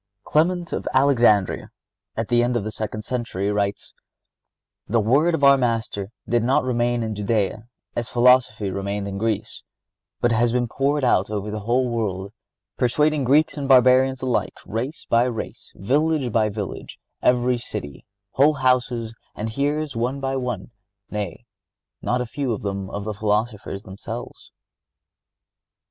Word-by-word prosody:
(64) - - -16
Clement 170 +2 +2
of - - -3
Alexandria, 120 -8 +3 0.5
at 115 -1 -1
the 120 -1 +4
end 120 0 +1
of 110 - -2
the 110 - -4
second 110 0 -5
century, 110 -5 -2
writes: 100 -1 -2 0.9
"The 115 +2 +2
word 140 +10 +3
of 140 - -4
our 140 0 +7
Master 115 -5 -1 0.2
did 120 0 +2
not 130 +3 +3
remain 120 -1 0
in 110 -1 -3
Judea, 105 +1 -1 0.3
as 120 -1 -2
philosophy 120 -5 +3
remained 100 +1 -3
in 100 0 -4
Greece, 110 0 -2 0.6
but 120 - +2
has 115 +1 +2
been 120 0 +1
poured 140 +4 0
out 105 -6 +3
over 105 0 -3
the 105 - -3
whole 120 +5 +1
world, 100 -4 -3 0.4
persuading 150 +3 +2
Greeks 150 +5 +3
and 140 -1 -3
Barbarians 130 0 +5
alike, 125 -2 -1
race 125 +8 -4
by 115 +1 +4
race, 120 -3 -5
village 140 +4 +1
by 110 -1 +2
village, 100 -1 -6 0.2
every 125 0 +2
city, 100 - -7 0.3
whole 145 +3 +4
houses 125 -4 +1 0.2
and 110 +2 -3
hearers 145 +2 -1
one 125 +4 -1
by 135 0 -2
one—nay, 105 -4 -6 0.6
not 125 +1 0
a - - -2
few 130 0 -2
of 105 - -6
the 100 +1 -4
philosophers 105 -1 -2
themselves." 95 0 -8
120 Hz, 145 wpm, -23 LUFS, 105-130 Hz, 0.9 s, our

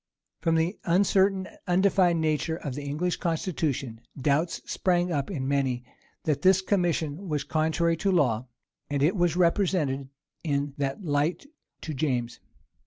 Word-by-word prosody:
From 165 -1 +1
the 165 +5 0
uncertain 190 +1 +3
and - - -15
undefined 180 -2 +3
nature 155 +1 0
of 145 -5 -5
the 145 - -5
English 150 +5 -2
constitution, 155 -8 -2 0.2
doubts 150 +5 +1
sprang 180 -1 +1
up 140 -4 -1
in 135 -9 -3
many, 135 -3 0 0.4
that 150 -3 0
this 190 0 +5
commission 175 -2 0
was 150 -2 -1
contrary 160 +1 +1
to 195 +3 +1
law; 130 -9 +2 0.4
and 140 -1 0
it 165 +7 +3
was 175 -3 +2
represented 170 -7 +1 0.3
in 145 -3 -1
that 140 +7 -2
light 150 - 0 0.4
to 155 - -5
James. 125 -5 -1
160 Hz, 145 wpm, -27 LUFS, 140-180 Hz, 0.4 s, this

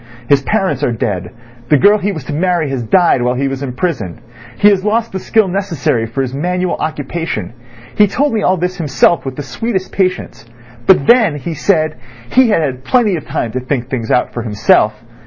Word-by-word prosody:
His 140 +1 +4
parents 190 - -1
are 125 - +1
dead; 105 -6 -3 0.4
the 150 - +5
girl 205 +6 +5
he 205 +1 -1
was 160 -8 -6
to 145 - -6
marry 170 -2 0
has 130 -2 -2
died 165 - +3
while 125 +1 0
he 135 +2 -1
was 135 0 -4
in 135 -3 -4
prison; 125 - -3 0.4
he 205 - +4
has 195 -2 +1
lost 225 +2 0
the 190 - -4
skill 215 +1 +2
necessary 175 - -1
for 135 +4 -2
his 130 -1 -5
manual 180 +5 -1
occupation. 150 - -4 0.4
He 210 - +5
told 280 +7 0
me 220 - 0
all 185 -1 +2
this 180 +2 -2
himself 155 -1 +2
with 135 -1 -5
the 145 - -5
sweetest 190 - -3
patience; 185 -11 -2 0.4
but 180 -7 +5
then, 225 - +4
he 165 +4 -5
said, 155 -1 0 0.3
he 255 -2 +4
had 190 -7 +2
had 130 -3 -3
plenty 220 - +2
of 155 - -7
time 115 - -2
to 130 - -2
think 130 0 -2
out 125 - -24
things 115 -4 -3 0.2
for 120 - -4
himself. 105 0 +2
155 Hz, 210 wpm, -15 LUFS, 130-190 Hz, 0.4 s, the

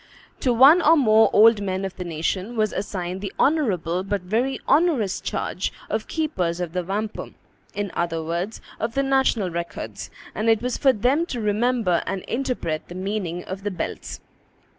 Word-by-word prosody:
To 255 - +1
one 275 +9 +7
or 325 +1 +6
more 220 -5 +5
old 220 0 +6
men 190 -1 -2
of 190 - -6
the 180 - -5
nation 180 +6 -3
was 215 -1 +1
assigned 185 -2 -4
the 200 -2 -4
honorable, 185 - +1
but 200 0 -2
very 235 +8 0
onerous, 280 - +2
charge - - -2 0.2
of - - -2
keepers 185 - -1
of 175 -2 -4
the 180 -1 -1
wampum, 205 +4 -4 0.4
in 205 -2 -2
other 165 -2 -1
words, 170 +6 -3 0.2
of 225 +2 -3
the 275 - +2
national 265 -8 +2
records; 170 0 -5 0.2
and 220 +2 0
it 225 -1 +4
was 250 0 -2
for 270 - +4
them 260 +9 +1
to 245 - -4
remember 215 -3 +1
and 195 -2 -3
interpret 235 -11 -3
the 175 - -9
meaning 185 -2 -3
of 190 +1 -6
the 205 - -2
belts. 180 -4 -5
205 Hz, 175 wpm, -23 LUFS, 180-245 Hz, 0.4 s, one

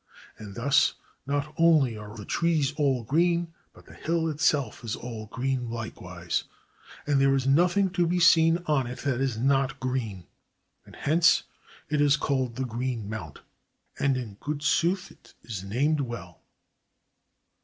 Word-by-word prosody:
And 105 -2 -9
thus 140 +4 +3 0.3
not 145 +2 -2
only 155 -8 +4
are 105 +1 -9
the 105 - -8
trees 160 -4 +1
all 135 -5 +1
green, 170 +6 +1 0.2
but - - -19
the - - -15
hill 165 0 -1
itself 145 -6 0
is 115 -1 -3
all 115 -3 -7
green 125 +1 -2
likewise; 90 -7 -4 0.6
and 145 -2 +2
there 135 0 +4
is 135 -1 0
nothing 175 +7 +3
to 175 -2 +1
be 180 +1 +1
seen 165 0 +5
on 140 -6 +1
it 125 - -6
that 135 -2 -1
is 130 -5 0
not 135 +2 +1
green; 115 -8 -3 0.6
and - - -14
hence 165 +3 +3 0.4
it 150 -2 0
is 145 0 +4
called 130 -4 -1
the 130 +1 -2
Green 120 -2 -3
Mount; 85 -10 -7 0.6
and 140 -2 +2
in 110 -6 -6
good 145 0 -4
sooth 180 +5 +1
't - - -20
is 100 -5 -6
named 140 +10 +1
well. 120 -3 -7
135 Hz, 155 wpm, -27 LUFS, 115-155 Hz, 0.6 s, seen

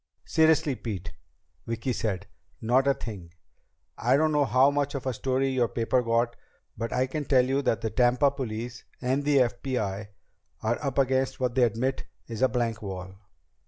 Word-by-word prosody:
"Seriously, 160 -3 +3
Pete," 105 -7 -5 0.6
Vicki 115 +3 -2
said, 100 -6 -2 0.3
"not 125 +4 +2
a 140 - +4
thing. 95 -7 -8 0.7
I 125 +4 +3
don't 155 +1 +2
know 150 -1 +3
how 130 +3 +4
much 145 0 -1
of 135 - -4
a 130 - 0
story 130 +3 0
your 130 -3 +2
paper 115 +2 +1
got, 115 0 +1 0.4
but 115 - -4
I 130 +1 +2
can 145 +3 -3
tell 130 -3 +4
you 135 +2 +1
that 115 -6 0
the 110 - -2
Tampa 125 +3 +3
police 120 -2 -5 0.2
and 130 +3 0
the 145 0 +3
FBI 110 -5 0 0.6
are 115 +6 -1
up 135 -3 -2
against 130 -1 +1
what 125 -2 0
they 130 - +2
admit 120 +3 +1 0.2
is 115 -1 -6
a 130 - +5
blank 115 -3 -1
wall." 95 -2 -6
125 Hz, 175 wpm, -27 LUFS, 115-135 Hz, 0.7 s, a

